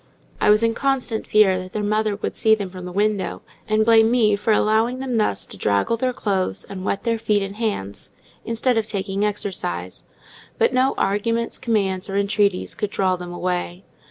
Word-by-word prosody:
I - - +3
was 210 +2 +5
in 230 0 +2
constant 255 -3 -1
fear 200 -3 +4
that 185 0 -9
their 215 - -2
mother 215 0 0
would 205 - -4
see 220 0 +4
them 200 -4 -5
from 185 -1 -8
the 180 - -6
window, 205 0 -1 0.3
and 215 0 +3
blame 225 -1 +6
me 225 -4 +3
for 205 +2 -1
allowing 220 +4 +2
them 260 -2 -2
thus 210 - +1
to - - -11
draggle 100 - +1
their 255 +2 0
clothes 195 -6 -2
and 190 -2 -7
wet 195 - -2
their 230 -1 0
feet 210 -2 +1
and 195 +1 -6
hands, 200 - -3 0.3
instead 230 +1 +1
of 215 - -3
taking 195 -1 -2
exercise; 95 - -3 0.5
but - - +2
no 255 +1 +2
arguments, 230 +4 -1
commands, 195 -5 -1
or 195 - -2
entreaties 200 -1 +1
could 210 - -3
draw 190 -2 +1
them 180 -1 -8
away. 180 +1 -3
210 Hz, 190 wpm, -22 LUFS, 190-225 Hz, 0.5 s, blame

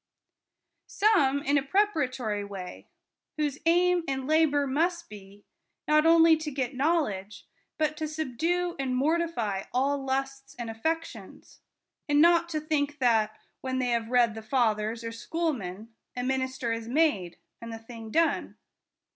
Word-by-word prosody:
Some 285 -10 +2
in 285 +1 +3
a - - -3
preparatory 270 - 0
way; 195 -3 -8 0.5
whose 295 -2 -1
aim 355 +1 +3
and 265 -1 -2
labor 300 -1 +3
must 335 +5 -1
be, 205 0 -13 0.4
not 305 +1 +4
only 330 0 +7
to 310 -1 -4
get 265 -2 -3
knowledge, 250 - -1 0.3
but 305 -1 0
to 310 - -2
subdue 320 +4 -1
and 260 -2 -1
mortify 265 -9 0
all 275 +3 0
lusts 270 0 -3
and 235 -2 -5
affections; 325 +9 -5 0.5
and 290 0 +4
not 340 +1 +5
to 310 -2 -2
think 295 -1 -1
that, 225 -5 +2 0.2
when 260 0 -2
they 255 -1 0
have 230 -1 -1
read 240 -2 +3
the 220 - -7
fathers 220 -1 0
or 230 - -4
schoolmen, 230 - -4 0.2
a 245 - -3
minister 260 -2 -1
is 230 0 -5
made 240 - +1 0.2
and 230 0 -7
the 225 - -5
thing 225 0 -10
done. 330 +7 0
270 Hz, 145 wpm, -28 LUFS, 230-315 Hz, 0.5 s, only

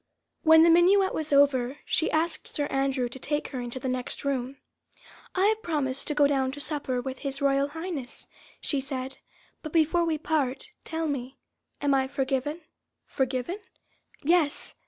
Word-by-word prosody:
When 320 -1 +7
the 335 - +6
minuet 380 +3 +5
was 310 -1 -3
over, 280 -2 +3
she 320 - +1
asked 315 +1 -1
Sir 290 - -2
Andrew 270 -2 +1
to 240 +2 -9
take 295 +3 -2
her 255 -3 -4
into 245 +1 -5
the 260 - -4
next 255 +2 -3
room. 270 -1 -2 0.8
"I 375 +1 +3
have 435 +1 +2
promised 280 -7 -1
to 300 - -1
go 295 -1 +5
down 270 -2 +1
to 290 - -8
supper 285 -4 -1
with 260 +1 -5
His 275 -1 -4
Royal 275 0 +2
Highness," 320 -4 -6 0.3
she 280 -3 0
said, 265 0 -5 0.4
"but 310 - -7
before 330 +1 +3
we 320 -2 0
part, 295 +3 -1
tell 325 -1 -2
me... 265 -2 -4 0.4
am 285 -1 +2
I 265 -1 +2
forgiven?" 275 +3 -2 0.4
"Forgiven?" 265 - -2 0.6
"Yes! 315 -1 +1
280 Hz, 165 wpm, -27 LUFS, 265-320 Hz, 0.8 s, When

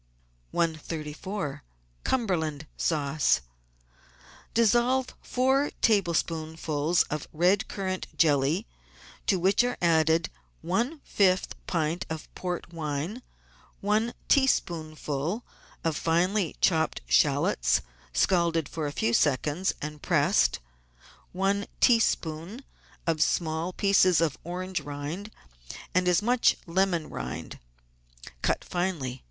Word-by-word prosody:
134— 160 +1 -3 0.4
CUMBERLAND 160 - -1
SAUCE 150 - +1 1.1
Dissolve 240 +3 +3
four 265 +3 +2
tablespoonfuls 165 -5 +1
of 150 -1 -5
red 180 +6 +2
currant 185 -2 -3
jelly, 150 +5 +3 0.6
to 195 - +3
which 190 +6 +3
are 245 - -1
added 160 -1 +3 0.3
one 235 - -1
fifth 185 -2 +2
pint 170 +2 -1
of 160 -1 -6
port 180 -1 -5
wine, 160 - -3 0.6
one 215 +3 0
teaspoonful 165 - 0 0.4
of 165 -2 0
finely 175 +4 +1
chopped 160 -3 +2
shallots, - - +3 0.3
scalded 170 - +2
for 155 -1 -3
a - - -3
few 115 -4 0
seconds 150 +7 +1
and 150 0 -6
pressed, - - +3 0.7
one 195 +2 0
teaspoonful 210 - +1 0.4
of 160 -2 0
small 160 +1 +1
pieces 185 -2 +4
of 165 -4 +1
orange 185 +2 -3
rind 145 +8 -5 0.6
and 185 0 +2
as 180 +3 +3
much 245 +2 +3
lemon 175 -2 +1
rind 60 0 -6 0.8
(cut - - 0
finely. 165 -9 -2
170 Hz, 100 wpm, -27 LUFS, 155-195 Hz, 1.1 s, pieces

